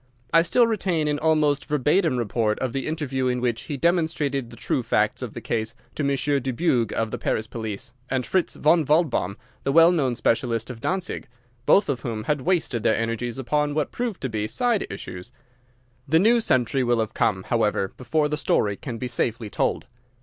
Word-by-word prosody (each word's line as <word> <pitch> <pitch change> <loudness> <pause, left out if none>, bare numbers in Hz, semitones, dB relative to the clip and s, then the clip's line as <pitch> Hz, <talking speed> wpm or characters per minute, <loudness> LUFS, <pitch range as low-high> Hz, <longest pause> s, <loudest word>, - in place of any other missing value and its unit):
I 165 - +7
still 205 +8 +4
retain 185 -8 0
an 145 -1 0
almost 150 -2 +2
verbatim 150 +1 +2
report 110 -2 0
of 130 -3 -3
the 135 -1 -2
interview 140 -5 -1
in 125 0 0
which 120 -2 -1
he 145 - -2
demonstrated 155 -6 0
the - - -11
true - - -1
facts - - +1
of - - -6
the - - -6
case 110 0 -2 0.2
to 150 - -3
Monsieur 140 +1 +1
Dubuque 125 - 0
of 110 -1 -1
the - - -4
Paris 110 - -1
police, 110 0 -6 0.2
and 130 -2 -1
Fritz 185 -2 0
von 160 +2 +3
Waldbaum, 145 - +1 0.3
the 135 - 0
well 165 +3 +7
known 135 -8 +1
specialist 115 0 0
of 115 -2 -10
Dantzig, 185 0 -2 0.4
both 200 - +5
of 135 -4 -1
whom 115 -3 -4
had 150 +3 0
wasted 155 -7 0
their 110 - +2
energies 115 +2 -2
upon 145 +3 0
what 155 -2 -1
proved 240 -5 -3
to 130 - -2
be 105 -2 -2
side 240 - 0
issues. 100 +2 -8 0.8
The 160 +4 +4
new 230 +6 +4
century 130 - +1
will 120 -1 +2
have 110 -2 -2
come, 95 -4 +1
however, 105 -4 0
before 150 +5 0
the 150 0 -2
story 100 -8 +1
can 120 -3 -6
be 125 - -3
safely 115 -2 -2
told. - - 0
135 Hz, 195 wpm, -24 LUFS, 115-160 Hz, 0.8 s, I